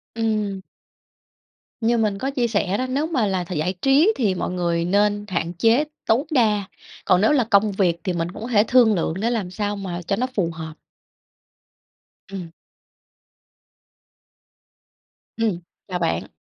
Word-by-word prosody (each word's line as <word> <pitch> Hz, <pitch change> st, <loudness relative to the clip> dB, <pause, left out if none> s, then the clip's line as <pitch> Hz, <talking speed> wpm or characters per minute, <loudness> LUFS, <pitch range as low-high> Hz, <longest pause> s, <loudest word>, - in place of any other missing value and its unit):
Ừm. 215 Hz, -4 st, -1 dB, 1.2 s
Như 235 Hz, +1 st, +2 dB
mình 210 Hz, -3 st, +1 dB
có 265 Hz, +7 st, -2 dB
chia 250 Hz, -4 st, 0 dB
sẻ 200 Hz, -3 st, 0 dB
đó, 255 Hz, -, -1 dB
nếu 285 Hz, +5 st, 0 dB
mà 265 Hz, -10 st, 0 dB
là 190 Hz, -2 st, -1 dB
th 175 Hz, -, -7 dB
giải 165 Hz, +3 st, -1 dB
trí 290 Hz, +10 st, +4 dB
thì 205 Hz, -7 st, +1 dB
mọi -, -, -3 dB
người 170 Hz, -2 st, 0 dB
nên 205 Hz, +2 st, +1 dB
hạn 175 Hz, -3 st, -2 dB
chế 225 Hz, -, +3 dB, 0.2 s
tối 235 Hz, +6 st, +2 dB
đa, 215 Hz, -7 st, +2 dB, 0.4 s
còn 180 Hz, 0 st, +4 dB
nếu 220 Hz, -, +4 dB
là 280 Hz, -4 st, +3 dB
công 210 Hz, -1 st, +3 dB
việc 180 Hz, -4 st, +1 dB
thì 185 Hz, -, -1 dB
mình 170 Hz, 0 st, -2 dB
cũng 210 Hz, -, -10 dB
có 230 Hz, -, -4 dB
thể 210 Hz, -3 st, +4 dB
thương 240 Hz, -3 st, +5 dB
lượng 165 Hz, -, -1 dB
để 230 Hz, -, +1 dB
làm 215 Hz, -7 st, -2 dB
sao 205 Hz, +2 st, -2 dB
mà 185 Hz, -3 st, -5 dB
cho 190 Hz, +3 st, -1 dB
nó 250 Hz, +5 st, -1 dB
phù 175 Hz, -5 st, +1 dB
hợp. 160 Hz, -1 st, -7 dB, 1.6 s
Ừm. 185 Hz, -4 st, -7 dB, 2.9 s
Ừm. 215 Hz, -6 st, 0 dB, 0.3 s
Chào 180 Hz, -2 st, -3 dB
bạn. 165 Hz, -1 st, -1 dB
205 Hz, 165 wpm, -22 LUFS, 180-230 Hz, 2.9 s, thương